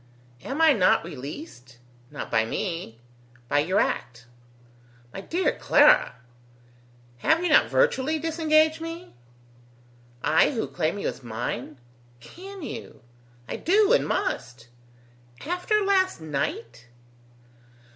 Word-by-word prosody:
"Am 275 +3 -5
I 315 -2 +7
not 185 -6 +3
released?" 140 - -9 0.3
"Not 145 - -7
by 110 - +3
me." 165 - -4 0.5
"By 145 - +2
your 175 +7 +1
act." 120 0 -2 0.9
"My 195 - -6
dear 350 - 0
Clara!" - - +4 1.0
"Have 320 - +2
you 355 - +1
not - - +5
virtually 315 - +1
disengaged 315 0 +2
me?" 330 +2 -8 1.1
"I 160 - +4
who 225 - -2
claim 165 +2 -2
you - - -3
as - - -5
mine?" 120 +4 -5 0.4
"Can 380 - -11
you?" 225 - -8 0.4
"I - - -4
do 415 +5 +3
and - - +2
must." 125 - -3 0.8
"After 360 +5 0
last 380 - +2
night?" 120 -6 -4
220 Hz, 115 wpm, -25 LUFS, -, 1.1 s, I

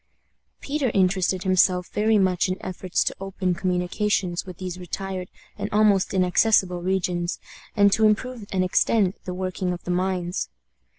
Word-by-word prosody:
Peter 285 -2 -1
interested 185 -1 +2
himself 185 -1 +3
very 215 +1 +2
much 185 -2 +2
in 185 - -1
efforts 185 -1 -2
to - - -1
open 190 -1 -2
communications 180 +1 -1
with 185 - -8
these 185 -1 -6
retired 185 +1 -5 0.3
and - - -3
almost 205 -2 +3
inaccessible 185 0 +2
regions, 180 -1 -1 0.4
and 200 0 +5
to 220 +2 +4
improve 220 0 -1
and 185 -1 +1
extend 190 +1 +2
the 180 - -4
working 185 0 -2
of 175 - -8
the 180 - -3
mines. 180 -1 -1
185 Hz, 150 wpm, -24 LUFS, 180-200 Hz, 0.4 s, and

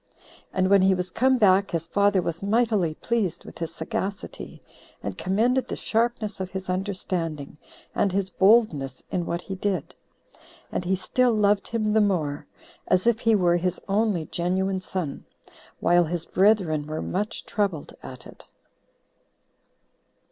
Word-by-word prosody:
And 185 0 +1
when 200 -1 +6
he 190 0 +4
was 180 0 -3
come 260 +4 +3
back, 195 -3 +4
his 165 -1 -2
father 200 +1 +2
was 165 0 -3
mightily 205 -6 +1
pleased 220 -6 -2
with - - -11
his 165 -1 -3
sagacity, 190 +5 -5 0.4
and 100 -2 -4
commended 235 - +1
the - - -4
sharpness 225 -3 -1
of 185 -1 -3
his 190 -1 -4
understanding, 180 -6 -3 0.3
and 200 - +1
his 190 0 -1
boldness 190 - +3
in 175 -2 -1
what 170 +1 -2
he 195 - -6
did. 190 -4 -2 0.8
And - - -2
he 190 +2 +2
still 245 +6 +1
loved 205 -1 +2
him 215 -2 -1
the 220 - +4
more, 160 -8 0 0.4
as 185 0 +2
if 235 -1 +3
he 230 -3 +3
were 175 -3 +3
his 180 0 -1
only 200 -4 +1
genuine 185 +4 -1
son, 185 -6 -4 0.6
while 175 0 +4
his 170 +1 -3
brethren 185 -7 +2
were 155 +1 -4
much 210 +4 -3
troubled 195 -8 -2
at 125 -1 -10
it. - - -13
190 Hz, 150 wpm, -25 LUFS, 170-210 Hz, 0.8 s, when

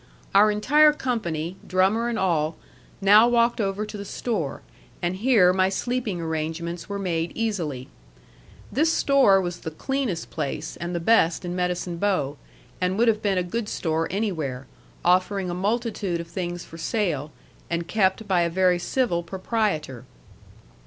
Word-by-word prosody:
Our 205 +2 +6
entire 295 +9 +5
company, 180 - -3
drummer 195 +6 +2
and 235 - -2
all, 165 -4 0 0.4
now 210 +4 +7
walked 235 -1 +2
over 200 +1 -1
to 210 - -8
the - - -5
store, 200 - -3 0.4
and 175 +1 -2
here 205 -5 +4
my 185 0 +2
sleeping 230 -1 -2
arrangements 165 +2 -4
were 200 - -3
made 170 -4 -2
easily. 165 - -2 0.8
This 305 +9 +2
store 270 -11 +4
was 175 -2 -3
the - - -5
cleanest 225 - -3
place 150 -4 -4
and 175 +1 -5
the - - 0
best 170 -2 +3
in 175 0 -3
Medicine 180 -1 -2
Bow, 170 -7 0 0.4
and 185 +1 0
would 235 +1 +4
have 215 -1 +1
been 200 -2 +1
a 180 - +1
good 210 +5 -3
store 160 -1 -1
anywhere, 160 - -2 0.4
offering 185 +1 +2
a - - -3
multitude 205 -2 -1
of 170 - -6
things 175 0 -4
for 165 - -12
sale, 165 -7 -1 0.4
and 170 0 -2
kept 205 +1 +1
by 185 -3 +3
a 170 - +1
very 180 0 +2
civil 180 -3 0
proprietor. 180 - -2
185 Hz, 155 wpm, -24 LUFS, 170-215 Hz, 0.8 s, now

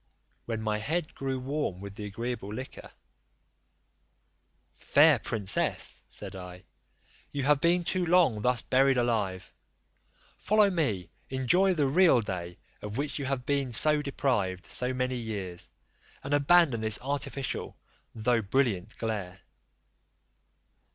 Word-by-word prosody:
When 115 -2 -3
my 105 -1 -1
head 160 +8 -2
grew 135 -1 -3
warm 135 -8 -3
with 100 0 -8
the 105 0 -7
agreeable 115 0 -5
liquor, 130 +5 -8 1.8
"Fair - - +4
princess," 100 -4 -2
said - - -6
I, 90 -1 -9 0.7
"you 140 -1 -3
have 145 +1 +3
been 175 +1 +3
too 185 +2 0
long 165 -11 +3
thus 125 0 +1
buried 135 0 +3
alive; 105 -6 -1 0.9
follow 210 -1 +3
me, 115 - -1 0.2
enjoy 175 +9 +3
the 150 -3 +2
real 160 0 +5
day, 90 -5 -5 0.2
of 105 +2 -6
which 145 +1 -2
you 140 - -3
have 130 -2 -2
been 140 -2 0 0.3
deprived 105 -10 -1
so 125 0 -2
many 125 0 -1
years, 100 -7 -5 0.5
and 140 +1 -3
abandon 145 -4 +4
this 110 -1 0
artificial 140 0 -3 0.4
though 115 +1 +1
brilliant 110 -3 -1
glare." 100 -5 -4
125 Hz, 125 wpm, -29 LUFS, 105-140 Hz, 1.8 s, real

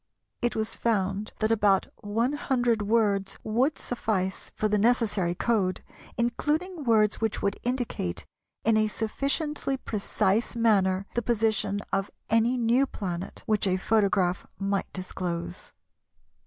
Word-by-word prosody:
It 240 - 0
was 220 0 -1
found 205 -2 -1
that 215 +1 +2
about 205 -3 +3
one 225 +6 -1
hundred 245 -6 +1
words 205 -2 +1
would 250 +8 +1
suffice 195 -6 -2
for 215 - +1
the 210 0 +1
necessary 210 -6 +2
code, 195 -4 0 0.3
including 300 +8 -1
words 215 -3 +3
which 220 -2 -1
would 200 0 0
indicate 245 - -2 0.4
in 225 0 +4
a 215 0 +3
sufficiently 275 +6 -1
precise 210 -1 0
manner 195 -5 +3
the 240 - 0
position 215 -3 0
of 195 0 0 0.2
any 230 +3 +3
new 245 +3 +3
planet 185 -5 -5
which 210 -2 +1
a 185 0 +2
photograph 195 -3 +1
might 195 -1 -1
disclose. 175 - -5
215 Hz, 130 wpm, -27 LUFS, 195-235 Hz, 0.4 s, in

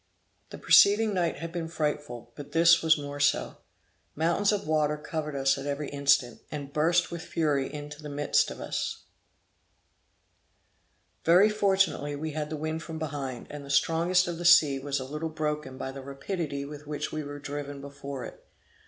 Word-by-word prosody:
The - - -8
preceding 210 +1 +5
night 175 -3 0
had 165 0 -6
been 170 -2 -4
frightful, 150 -7 -3
but 145 - -10
this 170 +1 +6
was 160 -1 +4
more 145 0 -6
so. 145 0 +1 0.6
Mountains 170 +6 +2
of 205 -2 -1
water 150 -1 +1
covered 150 0 -4
us 135 0 +2
at 135 - -6
every 145 +1 -3
instant, 140 -3 +2
and 140 -2 -6
burst 165 +3 +2
with 170 -1 -5
fury 145 -6 0
into 150 0 -8
the 150 - -7
midst 145 0 +1
of - - -8
us. - - -3 2.2
Very 180 +6 +6
fortunately 190 -8 +1
we 155 +2 -4
had 150 0 -3
the 155 - -4
wind 155 +1 -3
from 160 -1 -7
behind, 145 -5 -5
and 145 -1 -7
the 140 - -11
strongest 170 +5 +3
of 170 -1 -4
the - - -4
sea 155 -6 +6
was 140 0 -2
a 130 - -5
little 150 +4 -4
broken 150 -4 -3
by 135 - -4
the 135 0 -8
rapidity 140 +1 -4
with 150 0 -10
which 150 -1 -3
we 155 - -3
were 145 0 -7
driven 145 0 -6
before 140 -2 -7
it. - - -11
150 Hz, 180 wpm, -28 LUFS, 140-165 Hz, 2.2 s, this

